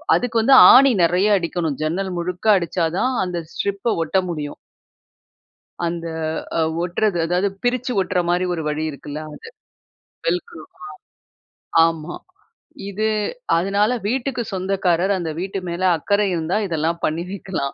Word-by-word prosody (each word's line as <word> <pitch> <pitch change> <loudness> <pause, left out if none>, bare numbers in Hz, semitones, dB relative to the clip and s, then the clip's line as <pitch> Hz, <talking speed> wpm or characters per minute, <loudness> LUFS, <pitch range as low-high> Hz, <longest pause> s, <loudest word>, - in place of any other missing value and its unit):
அதுக்கு 235 -2 0
வந்து 265 +4 +6 0.2
ஆணி 270 0 +7
நெறையா 180 +5 +3
அடிக்கணும். 165 -4 -2
ஜன்னல் 185 +4 -2
முழுக்க 180 +4 -4
அடிச்சா 170 -1 -1
தான் 260 +4 +1
அந்த 180 -1 -4 0.2
ஸ்ட்ரிப்ப 200 +3 -1
ஒட்ட 175 +4 -1
முடியும். 150 -3 -5 1.3
அந்த 170 0 -3 0.5
அ - - +1 0.2
ஒட்றது 180 +2 0
அதாவது 180 +4 +1
பிரிச்சு 250 +1 0
ஒட்ற 185 0 -1
மாரி 180 +1 +1
ஒரு 165 - -3
வழி 150 +1 -2
இருக்குல்ல 145 +1 -7
அது. - - -12 0.8
வெல்க்ரோவா? 170 -2 -4 1.1
ஆமா. 165 0 -3 0.7
இது 215 +2 -1 0.5
அதனால 200 +6 +1 0.2
வீட்டுக்கு 250 0 -1
சொந்தக்காரர், 185 -1 0
அந்த 170 -3 -3
வீட்டு 195 +2 -3
மேல 170 +2 -4 0.2
அக்கறை 200 +5 +1
இருந்தா 165 +3 -1
இதெல்லாம் 165 +1 -1
பண்ணி 160 +3 -1
வைக்கலாம். 190 -8 -4
180 Hz, 130 wpm, -21 LUFS, 165-200 Hz, 1.3 s, ஆணி